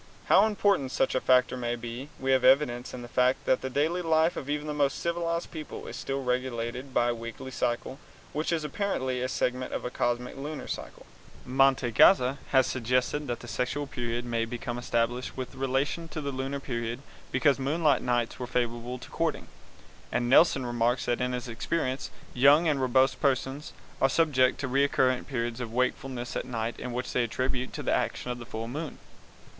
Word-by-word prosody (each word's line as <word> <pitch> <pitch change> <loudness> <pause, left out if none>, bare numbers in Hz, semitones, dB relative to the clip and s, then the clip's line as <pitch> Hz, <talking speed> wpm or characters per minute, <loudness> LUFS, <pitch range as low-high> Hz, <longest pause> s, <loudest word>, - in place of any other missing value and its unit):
How 205 +3 +6
important 200 -10 +1
such 135 - +1
a 130 - +1
factor 125 0 +4
may 120 -1 -2
be 120 +4 -7
we 135 0 0
have 130 -1 +3
evidence 130 -2 +3
in 125 - -7
the - - -8
fact 125 +1 +2
that 130 - +2
the 130 - -3
daily 155 +7 +1
life 160 0 +3
of 140 - -6
even 150 0 -1
the 150 - -3
most 145 -2 +1
civilized 170 0 -2
peoples 155 -2 -7
is - - -7
still 135 0 -3
regulated 125 0 -2
by 120 -1 +2
a - - +1
weekly 115 +3 -7
cycle 125 +2 -2 0.3
which 155 +3 -1
is 165 -2 0
apparently 135 -6 -1
a 130 - -1
segment 125 0 -1
of - - -3
the 125 - -3
cosmic 120 0 -1
lunar 145 +2 -5
cycle. - - -6 0.4
Mantegazza 130 - +4
has 130 -2 +5
suggested 125 +4 0
that 120 -1 -3
the 120 - -9
sexual 125 +4 -2
period 120 -3 -3 0.2
became 120 0 -4
established 120 +1 -1
with 130 0 -5
relation 135 +5 -1
to 160 - -6
the 140 -2 -3
lunar 135 +1 -3
period 120 -1 -4 0.3
because 140 +1 +3
moonlight 150 +4 +2
nights 120 -2 0
were 125 - -4
favorable 120 0 -2
to - - -12
courting, - - -2 0.6
and 120 0 0
Nelson 135 0 +5
remarks 120 +1 +1
that 120 +1 0
in 125 0 0
his 125 0 -3
experience 130 +3 -2 0.2
young 145 +6 +6
and 145 -3 +1
robust 130 +1 +3
persons 135 +1 0 0.3
are 135 - +5
subject 135 -4 +3
to 140 - -1
recurrent 130 -1 +2
periods 120 -2 -2
of 115 -2 -5
wakefulness 125 0 -2
at - - -2
night 115 -2 -3
which 125 +1 -3
they 125 - +2
attribute 125 +2 -2
to - - -5
the - - +1
action 125 - -1
of 120 - -5
the 120 - -9
full 115 -2 -5
moon. 150 +5 -5
130 Hz, 185 wpm, -28 LUFS, 120-140 Hz, 0.6 s, How